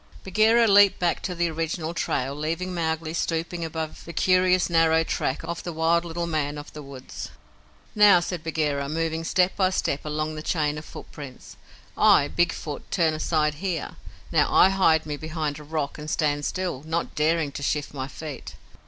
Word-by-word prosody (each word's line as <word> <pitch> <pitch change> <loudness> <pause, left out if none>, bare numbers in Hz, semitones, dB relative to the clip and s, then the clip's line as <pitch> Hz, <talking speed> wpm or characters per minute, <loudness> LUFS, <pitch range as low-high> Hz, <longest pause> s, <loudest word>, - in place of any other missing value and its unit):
Bagheera 220 +4 +4
leaped 200 -1 +6
back 175 -2 0
to 180 - -4
the 175 0 +1
original 165 +1 -3
trail, 135 -5 -1
leaving 165 +5 -3
Mowgli 160 -1 -2
stooping 165 +1 -2
above 160 -1 -5
the 170 - -9
curious 185 0 +3
narrow 165 -1 +3
track 135 -3 -2
of 170 0 -4
the 175 - -5
wild 165 +1 +1
little 170 0 -3
man 150 -3 -2
of 145 - -9
the 150 - -8
woods. 135 -2 -8 0.6
"Now," 205 -4 +7
said 175 -1 -4
Bagheera, 150 -3 -1
moving 165 +1 -2
step 180 +2 +2
by 190 -2 +2
step 150 -6 -1
along 155 +1 -2
the 155 - -6
chain 150 -2 -1
of 155 - -12
footprints, 140 -4 -10 0.4
"I, 140 - +5
Big 175 -1 +2
Foot, 150 -2 -7
turn 165 -3 +2
aside 155 -1 0
here. 180 -5 -3 0.3
Now - - +2
I 190 - +6
hide 165 -5 +3
me 150 -1 -4
behind 155 -1 -4
a - - -10
rock 150 -1 -3
and 150 +1 -6
stand 145 -1 0
still, 180 -8 -3
not 165 +1 -2
daring 155 -1 +1
to 140 - -7
shift 145 +1 -2
my 130 -2 -4
feet. 150 +1 -8
160 Hz, 180 wpm, -25 LUFS, 150-175 Hz, 0.6 s, Now